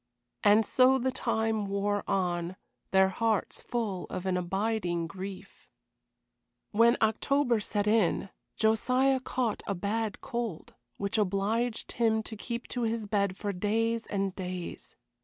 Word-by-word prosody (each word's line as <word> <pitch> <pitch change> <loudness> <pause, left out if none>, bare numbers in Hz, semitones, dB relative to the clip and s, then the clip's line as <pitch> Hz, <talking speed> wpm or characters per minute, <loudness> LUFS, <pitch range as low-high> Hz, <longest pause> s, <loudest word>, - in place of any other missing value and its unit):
And 210 +1 +6
so 260 +3 +5
the 260 0 0
time 220 -4 0
wore 200 +1 0
on, 175 -2 0 0.3
their 190 0 +5
hearts 220 +1 0
full 215 -7 -3
of 185 0 -5
an 190 -1 +1
abiding 180 -1 -1
grief. 190 +3 -9 1.0
When 230 +3 +5
October 240 +3 +2
set 205 0 -1
in 210 -3 +2 0.3
Josiah 255 +5 +3
caught 250 -3 -1
a 200 - 0
bad 210 +4 -2
cold, 235 -8 -4 0.2
which 200 +3 0
obliged 210 +4 0
him 220 -2 +1
to 220 - -7
keep 235 +2 -5
to 245 - -3
his 225 -1 -1
bed 200 -2 0
for 205 -1 -3
days 225 +4 0
and 195 -2 -1
days. 180 -2 -6
210 Hz, 135 wpm, -29 LUFS, 195-230 Hz, 1.0 s, And